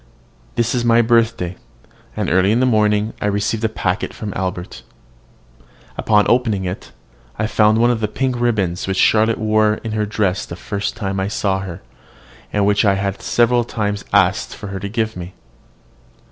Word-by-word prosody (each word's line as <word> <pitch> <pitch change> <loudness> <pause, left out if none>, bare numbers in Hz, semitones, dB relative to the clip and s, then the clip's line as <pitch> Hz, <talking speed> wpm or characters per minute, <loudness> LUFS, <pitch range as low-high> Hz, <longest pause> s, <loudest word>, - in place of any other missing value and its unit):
This 120 0 +1
is 125 -2 0
my 120 0 +4
birthday, 115 -6 +1 0.6
and - - -1
early 95 +2 +3
in 115 - +2
the 130 - +3
morning 105 -2 +2
I - - 0
received 105 +2 -1
a 110 - +2
packet 95 -3 -2
from 105 -3 -5
Albert. 90 -1 -4 1.1
Upon 105 -2 +3
opening 115 -6 +1
it, 90 +1 -6 0.5
I 110 - 0
found 105 0 +3
one 120 +2 +4
of 120 - -1
the 110 - 0
pink 130 +1 -2
ribbons 95 -8 0
which 95 -1 -1
Charlotte 110 +2 +3
wore 110 0 +2
in 115 - -4
her 105 -1 -1
dress 100 -3 0
the 85 - -7
first 100 +4 -4
time 100 -4 -3
I 95 - -1
saw 100 -2 -1
her, 95 -6 -7 0.7
and 105 -1 +1
which 100 +2 +3
I 100 -2 +3
had 100 0 -3
several 120 0 +2
times 105 -3 -3
asked - - +2
her 100 -2 -6
to 100 +2 -5
give 110 0 -2
me. 90 +1 -8
105 Hz, 175 wpm, -19 LUFS, 95-115 Hz, 1.1 s, my